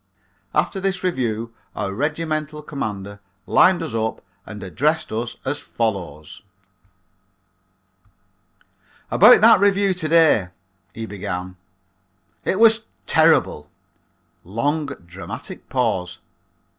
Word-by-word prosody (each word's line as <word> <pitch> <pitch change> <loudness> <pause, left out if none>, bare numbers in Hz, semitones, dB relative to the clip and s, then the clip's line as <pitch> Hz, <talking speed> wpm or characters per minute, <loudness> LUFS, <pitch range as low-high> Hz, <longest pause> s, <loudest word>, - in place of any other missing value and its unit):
After 195 - +1
the 190 0 -1
review 115 -9 -2 0.2
our 95 - -3
regimental 155 +3 -3
commander 100 -8 -5 0.3
lined 180 -2 +4
us 155 -7 -5
up 110 0 -2 0.2
and 105 -2 -8
addressed 150 - -1
us 115 +2 -3
as 145 +2 -2
follows: 90 -10 -4 2.7
"About 215 +1 +7
that 225 -2 +7
review 200 -1 +3
to 175 -3 -4
day," 160 - +4 0.4
he 110 +4 -6
began, 95 -3 -5 0.9
"it 190 - 0
was 225 0 +5 0.2
terrible" 75 0 +3 0.7
(long, 145 - -1 0.2
dramatic 90 +2 -9
pause). 105 -8 -1
125 Hz, 95 wpm, -21 LUFS, 100-165 Hz, 2.7 s, About